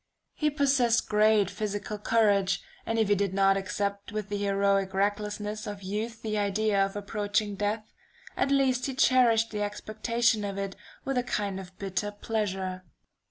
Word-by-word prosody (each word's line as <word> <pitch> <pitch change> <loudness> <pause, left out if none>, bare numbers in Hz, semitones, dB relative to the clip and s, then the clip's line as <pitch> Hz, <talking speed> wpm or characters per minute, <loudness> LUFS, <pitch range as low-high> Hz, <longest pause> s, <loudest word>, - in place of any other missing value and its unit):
He 300 - +1
possessed 270 -5 +2
great 210 -2 +4
physical 210 0 -4
courage, 200 -4 +2 0.2
and 225 - 0
if 220 -2 +3
he 205 - +4
did 200 -1 0
not 195 0 +4
accept 200 +1 -3
with 210 -1 -4
the 205 - -2
heroic 195 -1 +1
recklessness 210 +1 -1
of 205 -1 -6
youth 215 +4 -4
the 215 -1 -1
idea 205 0 +2
of 195 0 -3
approaching 205 0 -1
death, 210 +2 -2 0.4
at - - +1
least 265 -2 +2
he 270 - -4
cherished 235 -4 +4
the 210 -1 -3
expectation 215 +2 0
of 200 -1 -4
it 195 -1 -3 0.3
with 270 -2 0
a - - -1
kind 205 -5 -2
of 185 -1 -11
bitter 195 +1 -2
pleasure."... 195 -3 -3
205 Hz, 160 wpm, -28 LUFS, 200-225 Hz, 0.4 s, great